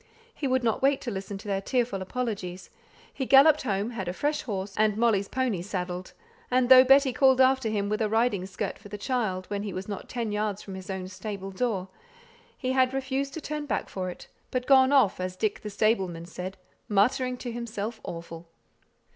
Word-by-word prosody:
He 290 Hz, -, -3 dB
would 260 Hz, -1 st, +1 dB
not 225 Hz, -2 st, +1 dB
wait 275 Hz, +1 st, +3 dB
to 240 Hz, -, -4 dB
listen 195 Hz, 0 st, -5 dB
to 210 Hz, +2 st, -11 dB
their 195 Hz, -1 st, -1 dB
tearful 235 Hz, -3 st, -1 dB
apologies; 190 Hz, -4 st, -4 dB, 0.4 s
he 265 Hz, -, -3 dB
galloped 285 Hz, +3 st, +7 dB
home, 205 Hz, -1 st, -1 dB
had 195 Hz, -6 st, -5 dB
a 175 Hz, -, -2 dB
fresh 295 Hz, +9 st, -1 dB
horse 195 Hz, -3 st, -4 dB
and 215 Hz, -1 st, +2 dB
Molly's 220 Hz, -4 st, +2 dB
pony 250 Hz, -8 st, -1 dB
saddled, 180 Hz, -1 st, -4 dB, 0.4 s
and 255 Hz, 0 st, +2 dB
though 255 Hz, -1 st, +10 dB
Betty 270 Hz, 0 st, +5 dB
called 265 Hz, -1 st, +4 dB
after 260 Hz, -2 st, +4 dB
him 205 Hz, -2 st, -1 dB
with 215 Hz, +2 st, -1 dB
a 215 Hz, -, +1 dB
riding 220 Hz, -4 st, +1 dB
skirt 190 Hz, -, -4 dB
for 205 Hz, -, -13 dB
the 210 Hz, -, -6 dB
child, 205 Hz, -5 st, -1 dB
when 200 Hz, -1 st, -1 dB
he 205 Hz, -1 st, -4 dB
was 185 Hz, +1 st, -5 dB
not 200 Hz, -2 st, -6 dB
ten 235 Hz, -3 st, -3 dB
yards 210 Hz, -1 st, -2 dB
from 195 Hz, -, -8 dB
his 190 Hz, +1 st, -8 dB
own 190 Hz, -1 st, -4 dB
stable 195 Hz, 0 st, -6 dB
door, 195 Hz, -3 st, -1 dB, 0.7 s
he 255 Hz, 0 st, -1 dB
refused 270 Hz, +1 st, -3 dB
to 320 Hz, -, -5 dB
turn 300 Hz, 0 st, -4 dB
back -, -, -2 dB
for 185 Hz, -1 st, -3 dB
it, 180 Hz, -, -9 dB, 0.2 s
but 255 Hz, 0 st, -2 dB
went 265 Hz, -1 st, +6 dB
off, 265 Hz, -11 st, +4 dB
as 185 Hz, 0 st, -3 dB
Dick 205 Hz, +2 st, -1 dB
the 210 Hz, -, -5 dB
stableman 195 Hz, -5 st, 0 dB
said, 180 Hz, +2 st, -7 dB, 0.3 s
"muttering 250 Hz, +5 st, +2 dB
to 245 Hz, -1 st, -5 dB
himself 230 Hz, -1 st, -5 dB
awful." 165 Hz, 0 st, -8 dB
215 Hz, 200 wpm, -27 LUFS, 190-255 Hz, 0.7 s, though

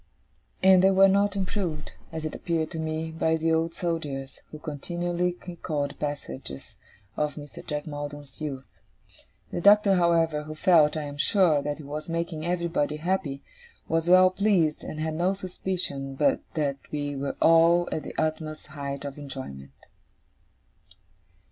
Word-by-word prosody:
And 190 Hz, -1 st, +7 dB
they 190 Hz, -, +7 dB
were 195 Hz, 0 st, +6 dB
not 200 Hz, +1 st, +3 dB
improved, 185 Hz, -5 st, -2 dB, 0.2 s
as 160 Hz, -1 st, -5 dB
it 155 Hz, -, -3 dB
appeared 165 Hz, -2 st, -2 dB
to 160 Hz, -, -5 dB
me, 160 Hz, 0 st, -2 dB
by 160 Hz, 0 st, +1 dB
the 160 Hz, 0 st, +1 dB
Old 165 Hz, +1 st, 0 dB
Soldier: 155 Hz, -6 st, -2 dB, 0.2 s
who 155 Hz, -, -8 dB
continually 175 Hz, +4 st, -2 dB
recalled 155 Hz, -5 st, -3 dB
passages 70 Hz, -, -6 dB, 0.4 s
of 150 Hz, -1 st, -1 dB
Mr. 145 Hz, -2 st, -9 dB
Jack 150 Hz, 0 st, -3 dB
Maldon's 145 Hz, -2 st, -7 dB
youth. 135 Hz, -3 st, -4 dB, 0.9 s
The -, -, -3 dB
Doctor, 205 Hz, +1 st, +6 dB
however, 165 Hz, -3 st, +3 dB
who 155 Hz, 0 st, -7 dB
felt, 155 Hz, -3 st, +4 dB
I 155 Hz, -, -2 dB
am 145 Hz, 0 st, -7 dB
sure, 165 Hz, -3 st, +3 dB
that 145 Hz, 0 st, -3 dB
he 155 Hz, -, -10 dB
was 150 Hz, +3 st, -6 dB
making 165 Hz, -1 st, -2 dB
everybody 170 Hz, -4 st, 0 dB
happy, 155 Hz, -5 st, -2 dB, 0.4 s
was 165 Hz, +1 st, 0 dB
well 185 Hz, 0 st, +7 dB
pleased, 185 Hz, -6 st, +2 dB
and 155 Hz, -, -6 dB
had 160 Hz, 0 st, -1 dB
no 180 Hz, +4 st, +1 dB
suspicion 180 Hz, -7 st, -3 dB
but 145 Hz, +1 st, +3 dB, 0.2 s
that 145 Hz, -3 st, 0 dB
we 145 Hz, -1 st, -2 dB
were 140 Hz, 0 st, -3 dB
all 165 Hz, +1 st, +5 dB
at 155 Hz, -, -1 dB
the -, -, -8 dB
utmost 155 Hz, 0 st, -2 dB
height 140 Hz, -1 st, -5 dB
of 140 Hz, +1 st, -6 dB
enjoyment. 130 Hz, -, -8 dB
160 Hz, 155 wpm, -27 LUFS, 145-175 Hz, 0.9 s, And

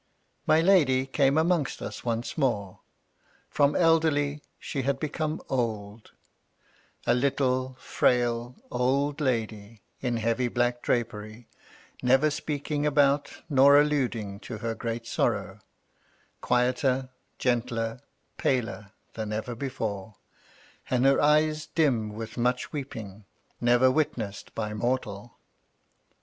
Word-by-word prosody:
My 155 Hz, +1 st, +5 dB
Lady 150 Hz, -8 st, +4 dB
came 135 Hz, +1 st, +2 dB
amongst 165 Hz, -3 st, +1 dB
us -, -, -6 dB
once 115 Hz, 0 st, -2 dB
more. 105 Hz, -, -1 dB, 0.7 s
From 145 Hz, 0 st, +3 dB
elderly 155 Hz, -3 st, +2 dB, 0.2 s
she 140 Hz, -, -4 dB
had 135 Hz, +1 st, -1 dB
become 155 Hz, +1 st, -3 dB
old; 110 Hz, -4 st, -3 dB, 0.9 s
a -, -, +4 dB
little, 130 Hz, 0 st, 0 dB
frail, 120 Hz, 0 st, +1 dB, 0.2 s
old 140 Hz, +4 st, 0 dB
lady, 110 Hz, -5 st, -2 dB, 0.2 s
in 125 Hz, -2 st, -1 dB
heavy 115 Hz, +2 st, 0 dB
black 120 Hz, 0 st, 0 dB
drapery, 110 Hz, -1 st, -3 dB, 0.5 s
never 135 Hz, +4 st, +4 dB
speaking 145 Hz, 0 st, -3 dB
about 145 Hz, -1 st, +3 dB, 0.2 s
nor 140 Hz, -1 st, +6 dB
alluding 125 Hz, -9 st, 0 dB
to 115 Hz, -, -7 dB
her 115 Hz, +1 st, -3 dB
great 115 Hz, +1 st, -4 dB
sorrow; -, -, -1 dB, 0.8 s
quieter, 130 Hz, +1 st, +1 dB, 0.3 s
gentler, 120 Hz, -2 st, -1 dB, 0.4 s
paler 115 Hz, -5 st, -1 dB, 0.2 s
than 110 Hz, -1 st, -4 dB
ever 110 Hz, +3 st, -3 dB
before; 110 Hz, -6 st, -4 dB, 0.7 s
and 125 Hz, 0 st, +2 dB
her 135 Hz, 0 st, +5 dB
eyes 155 Hz, +1 st, +3 dB
dim 125 Hz, -10 st, +1 dB
with 115 Hz, +2 st, -6 dB
much 125 Hz, +1 st, 0 dB
weep 140 Hz, -2 st, -5 dB
ing, 100 Hz, -1 st, -9 dB, 0.4 s
never 120 Hz, +2 st, +5 dB
witnessed 120 Hz, -8 st, -2 dB
by 105 Hz, -1 st, -3 dB
mortal. 115 Hz, -2 st, -3 dB
125 Hz, 110 wpm, -27 LUFS, 115-140 Hz, 0.9 s, nor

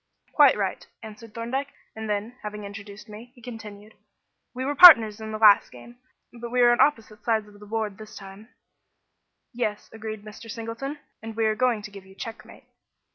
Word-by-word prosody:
"Quite -, -, +5 dB
right," -, -, -3 dB, 0.2 s
answered 220 Hz, 0 st, -12 dB
Thorndyke, 260 Hz, +5 st, -4 dB, 0.2 s
and 220 Hz, -1 st, -6 dB
then, 210 Hz, +4 st, -3 dB
having 210 Hz, 0 st, -7 dB
introduced 200 Hz, +1 st, -10 dB
me, 215 Hz, +2 st, -11 dB
he -, -, -18 dB
continued: 215 Hz, -3 st, -10 dB, 0.6 s
"We 255 Hz, +1 st, -5 dB
were 285 Hz, -, -1 dB
partners 230 Hz, -10 st, +8 dB
in 220 Hz, 0 st, -6 dB
the 215 Hz, -, -4 dB
last 210 Hz, -2 st, +5 dB
game, 235 Hz, -, -14 dB, 0.3 s
but 235 Hz, 0 st, -8 dB
we 250 Hz, +1 st, +1 dB
are 240 Hz, 0 st, +6 dB
on 240 Hz, -, +2 dB
opposite 225 Hz, -6 st, 0 dB
sides 220 Hz, -2 st, 0 dB
of 205 Hz, 0 st, -17 dB
the 210 Hz, -, -13 dB
board 215 Hz, -2 st, -4 dB
this 215 Hz, 0 st, -12 dB
time." 195 Hz, +3 st, -12 dB, 1.0 s
"Yes," 220 Hz, -4 st, -4 dB
agreed 220 Hz, -1 st, -7 dB
Mr. 215 Hz, +2 st, -12 dB
Singleton; 230 Hz, +6 st, -6 dB, 0.2 s
"and 225 Hz, 0 st, -8 dB
we 225 Hz, 0 st, 0 dB
are 215 Hz, -, +2 dB
going 230 Hz, -2 st, 0 dB
to 210 Hz, -, -9 dB
give 195 Hz, -1 st, -13 dB
you 190 Hz, -, -17 dB
check 225 Hz, +2 st, -8 dB
mate." -, -, -16 dB
220 Hz, 190 wpm, -25 LUFS, 210-235 Hz, 1.0 s, partners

